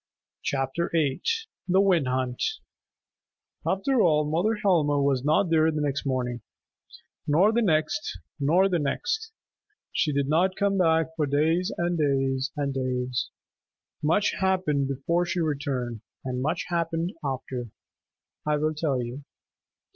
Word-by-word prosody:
CHAPTER 135 +5 -1
IX 145 -5 +1 0.5
THE 185 +1 +4
WIND 180 -8 +3
HUNT 125 -1 -1 1.3
After 230 +6 +2
all, 150 -4 +4
Mother 175 +9 +1
Helma 170 -9 +2
was 140 -2 +1
not 155 +4 +2
there 160 -1 +4
the 155 -1 -1
next 140 -1 -1
morning, 125 -2 -1 0.9
nor 170 +8 +4
the 235 +1 +2
next, 160 - 0 0.2
nor 170 +7 +4
the 180 -3 +1
next. 295 - -2 0.6
She 155 - +1
did 140 -1 0
not 180 +5 +2
come 200 -1 +1
back 160 -2 +2
for 155 -3 0
days 160 +6 +1
and 175 -1 0
days 135 -1 +1
and 140 -2 -1
days. 125 -1 -2 0.7
Much 165 +7 +2
happened 185 -8 +1
before 170 +6 0
she 175 +1 -2
returned, 135 -7 -2 0.2
and 125 -1 -2
much 155 +6 -1
happened 170 +1 -1
after. 130 -3 -4 0.7
I 150 0 +1
will 155 +1 0
tell 145 -5 -1
you. 125 +4 -7
150 Hz, 135 wpm, -26 LUFS, 135-175 Hz, 1.3 s, THE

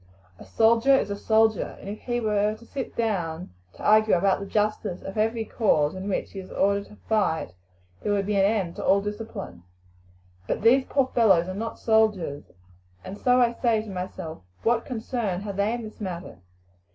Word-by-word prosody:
A - - -11
soldier 230 +4 +4
is 235 - 0
a - - -1
soldier, 220 0 +1
and - - -11
if 205 +2 -5
he 240 -1 -2
were 210 -1 +1
to 235 - -16
sit 265 +1 -6
down 180 -7 -2 0.2
to - - -12
argue 215 0 +5
about 190 +2 +2
the 200 - -6
justice 210 -3 -1
of 195 - -7
every 225 +1 0
cause 155 -11 +1
in 190 +2 -5
which 195 - -2
he 195 - -7
is 190 - -9
ordered 200 +1 +1
to - - -15
fight 195 - 0 0.5
there 210 - -1
would 200 -1 +1
be 205 +1 -1
an 195 - +4
end 195 -4 0
to - - -4
all 195 - +4
discipline. 205 - -6 0.9
But - - -2
these 260 +4 +5
poor 270 -2 0
fellows 190 -7 +4
are 185 - -4
not 225 +4 -4
soldiers, 210 -10 +1 0.6
and 190 - -6
so 250 +4 +3
I 240 -1 +3
say 230 -3 +1
to 215 - -9
myself, 180 - -6 0.2
What 230 0 +2
concern 225 -6 -3
have 200 -1 -5
they 200 +2 +1
in 240 0 -3
this 215 0 -10
matter? 180 - -6
210 Hz, 195 wpm, -25 LUFS, 190-225 Hz, 0.9 s, argue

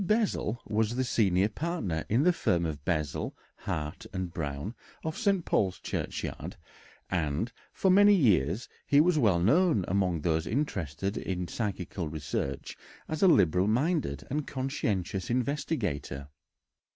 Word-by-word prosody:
Bessel 195 - +1
was 110 +2 0
the 130 - +1
senior 100 -5 +3
partner 110 - -2
in 120 +7 +3
the 180 +2 +5
firm 85 - +1
of 75 -3 -4
Bessel, 75 -4 -1 0.2
Hart, 75 +2 -4
and 95 -2 -4
Brown, 75 +6 -4 0.3
of 160 0 -3
St. 200 -6 +1
Paul's 95 -3 +1
Churchyard, - - -4 0.6
and 85 +5 0 0.2
for 190 - +2
many 205 +2 +7
years 100 - +2 0.2
he 145 - +5
was 165 0 +4
well 100 -9 +4
known 135 - +3
among 90 -4 +1
those 80 +1 0
interested 100 - -2
in 90 -2 -3
psychical 95 -6 -3
research 70 -2 -3 0.3
as 155 -1 -3
a 195 - +7
liberal 90 - +4
minded 120 - 0
and 150 +1 -1
conscientious 110 -9 -2
investigator. 120 - -2
100 Hz, 135 wpm, -29 LUFS, -, 0.6 s, many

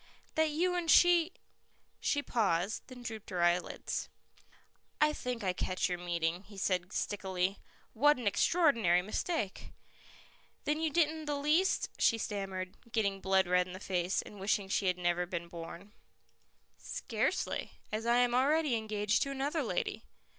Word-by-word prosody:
"That 315 0 +2
you 350 +4 +1
and 350 -2 -1
she 350 0 +6 0.4
" - - -42 0.3
She 285 -1 0
paused, 200 -5 0
then 250 -2 -11
drooped 220 -3 -6
her 175 -2 0
eyelids. 175 +1 0 0.9
"I 300 0 +4
think 250 -5 -4
I 185 -2 +1
catch 185 0 -1
your 180 -1 -3
meaning," 170 0 -1
he 200 0 -15
said 185 -1 0
stickily. 190 -2 -1 0.3
"What 290 +5 +4
an 245 - -6
extraordinary 220 - +3
mistake!" 215 - -3 0.9
"Then 300 +1 0
you 320 - +1
didn't 315 0 +1
the 295 -1 -1
least 310 +7 +2
" - - -24
she 230 - +4
stammered, 195 -4 -4
getting 200 -4 0
blood 190 0 +3
red 180 0 +3
in 180 - -8
the 185 - -7
face, 180 -1 -1
and 205 - -12
wishing 195 0 0
she 195 0 +1
had 180 -1 +2
never 175 0 0
been 170 -1 -4
born. 170 +4 -9 0.9
"Scarcely, - - -2 0.2
as 220 +2 -2
I 240 +1 +4
am 245 -1 +3
already 290 +3 +3
engaged 215 -1 0
to 275 - 0
another 275 +4 -1
lady." - - -2
210 Hz, 160 wpm, -32 LUFS, 185-285 Hz, 0.9 s, she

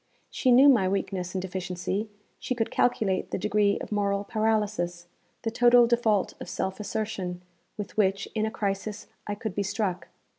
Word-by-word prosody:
She 255 - +2
knew 260 +4 +8
my 220 -9 +5
weakness 190 -2 -2
and 185 - 0
deficiency; 185 +3 -3 0.3
she 255 - -2
could 225 -2 -1
calculate 210 -6 +1
the - - -2
degree 205 0 +2
of - - -7
moral 200 -1 0
paralysis, 210 -5 -1 0.4
the 225 - -1
total 240 +1 +6
default 230 -4 +2
of - - -6
self 190 +1 -3
assertion, 195 -4 -4 0.3
with 205 0 -7
which, 200 -1 +2
in 220 -1 0
a - - -1
crisis, 205 -1 -3 0.2
I 205 - -2
could 210 -1 -5
be 205 - -1
struck. 195 -2 -2
205 Hz, 165 wpm, -27 LUFS, 190-220 Hz, 0.4 s, knew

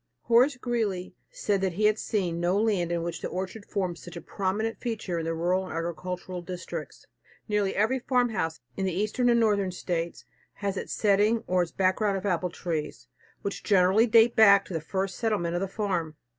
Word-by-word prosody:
Horace 250 +4 +4
Greeley 220 -8 -2 0.2
said 200 -2 -1
he 190 +2 0
had 215 0 +3
seen 180 -6 -1
no 175 +3 +2
land 200 -6 +1
in 170 -1 -1
which 170 -1 -4
the - - -2
orchard 190 +3 -5
formed 185 -4 -2
such 175 -1 -11
a 170 - -6
prominent 200 +6 -2
feature 210 -7 -3
in 165 - -3
the 165 0 -1
rural 180 +3 0
and - - -7
agricultural 180 +2 -4
districts. 180 0 -7 0.4
Nearly 210 -2 0
every 220 +6 +2
farmhouse 235 -11 0
in 190 -1 -1
the 180 - -2
Eastern 215 +5 +1
and 235 -1 +4
Northern 205 -4 +2
States 170 -2 -3 0.3
has 200 -1 -3
its - - -5
setting 210 +2 +2
or 180 0 +2
its 175 - -2
background 195 +2 +1
of 190 - -6
apple 180 -2 0
trees, 155 -7 -4 0.3
which 200 - -3
generally 195 +3 +4
date 230 +1 +5
back 200 -3 +7
to - - -8
the 165 - -2
first 190 +3 -3
settlement 210 -7 0
of 175 - -1
the 195 - -1
farm. 185 -6 -2
190 Hz, 190 wpm, -27 LUFS, 175-215 Hz, 0.4 s, back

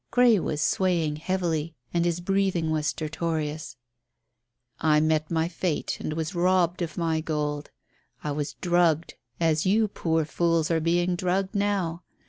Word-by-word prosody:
Grey 245 -4 +5
was 150 -3 -2
swaying 170 -5 +1
heavily 165 -2 -1 0.2
and 170 0 +2
his 175 0 0
breathing 190 -3 +1
was 155 -1 0
stertorous. 155 -1 -3 1.0
"I 155 -1 +4
met 155 0 +1
my 165 -1 +1
fate 170 -2 -2
and 155 - -3
was 160 0 -3
robbed 180 0 +2
of 165 -2 -4
my 165 -2 +1
gold. 150 -2 -2 0.5
I 150 - -2
was 145 0 -3
drugged 175 -2 +2 0.3
as 160 +1 +2
you 215 +3 +3
poor 165 -5 0
fools 165 0 +1
are 165 - +3
being 175 +2 +2
drugged 185 +2 -1
now. 200 -5 0
165 Hz, 145 wpm, -26 LUFS, 155-180 Hz, 1.0 s, Grey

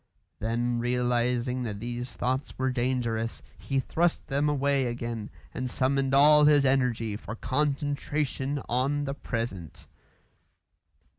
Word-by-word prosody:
Then 120 +2 0
realising 125 +1 0
that 105 -4 -4
these 120 +2 -5
thoughts 130 +3 -2
were 130 0 +1
dangerous, 120 -3 -1
he 135 -1 -2
thrust 170 +6 0
them 145 +2 +1
away 140 -2 +1
again 120 -2 -4 0.2
and 130 0 -3
summoned 135 +2 +1
all 150 +1 +7
his 145 -2 +5
energy 125 -5 +1
for 110 +1 -7
concentration 145 +1 -1
on 135 +4 0
the 140 -1 -2
present. 115 - -5
130 Hz, 120 wpm, -28 LUFS, 120-140 Hz, 0.2 s, all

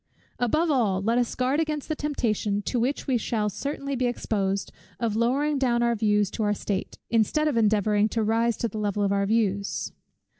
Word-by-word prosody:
Above 305 +7 +2
all, 215 -9 +2
let 230 +5 +1
us 245 - -1
guard 255 +4 +1
against 305 -3 -2
the 310 - -1
temptation, 215 -9 -1
to 245 - -1
which 255 +5 -1
we 255 -3 +1
shall 215 -1 -1
certainly 275 +5 -4
be 250 -1 +1
exposed, 200 -5 -1 0.3
of 230 -3 -1
lowering 275 +6 +1
down 240 -3 +2
our 235 0 +2
views 210 -2 +1
to - - -4
our 210 -1 +1
state, 195 -1 -3
instead 235 +7 +2
of 300 - 0
endeavouring 215 -1 +3
to 225 0 -1
rise 225 +2 +1
to 235 - -1
the 215 -1 -6
level 205 -1 0
of 200 - +1
our 200 0 +1
views. 200 -2 0
230 Hz, 195 wpm, -26 LUFS, 210-255 Hz, 0.3 s, endeavouring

